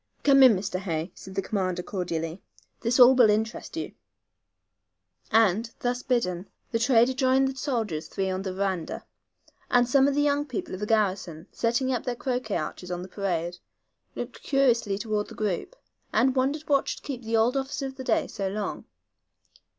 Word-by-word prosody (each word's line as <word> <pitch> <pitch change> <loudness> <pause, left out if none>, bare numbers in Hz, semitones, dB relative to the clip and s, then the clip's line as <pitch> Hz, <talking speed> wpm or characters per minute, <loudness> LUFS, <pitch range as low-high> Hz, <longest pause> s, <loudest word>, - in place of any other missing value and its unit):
"Come 275 -1 +6
in, 255 -5 +8
Mr. 185 -1 -3
Hay," 170 -2 -3
said 190 0 -11
the 195 - 0
commander, 185 -3 -2
cordially. 170 -2 -4 0.4
"This 235 +2 0
all 250 +1 +9
will 245 -4 +6
interest 220 +8 -1
you," 325 - -4 1.4
and, 225 0 +3
thus 245 0 -1
bidden, 200 -9 -1 0.2
the 230 - 0
trader 245 +1 +4
joined 265 0 +3
the 265 - -6
soldiers 230 - -2
three 195 -1 -2
on 185 0 -2
the 190 -1 -3
veranda, 190 -3 -3 0.6
and 245 -1 +4
some 270 +2 +4
of 280 - +1
the 290 - +2
young 290 0 +1
people 250 -7 -5
of 185 - -5
the 210 - -3
garrison, 190 -7 0
setting 245 +3 0
up 245 - -2
their 250 -2 -1
croquet 245 -4 -2
arches 175 +3 -5
on 180 0 -4
the - - -8
parade, 175 -3 -2 0.6
looked - - -6
curiously 240 -7 +2
toward 210 -1 -2
the - - -11
group, 210 - -2 0.4
and 260 0 +3
wondered 275 +4 0
what 280 -3 +2
should - - -4
keep 265 -4 -5
the 225 -1 0
old 235 +4 +3
officer 270 +1 -2
of 265 0 -6
the 260 - -6
day - - +1
so 195 - -4
long. 205 +2 -4
225 Hz, 180 wpm, -26 LUFS, 190-260 Hz, 1.4 s, all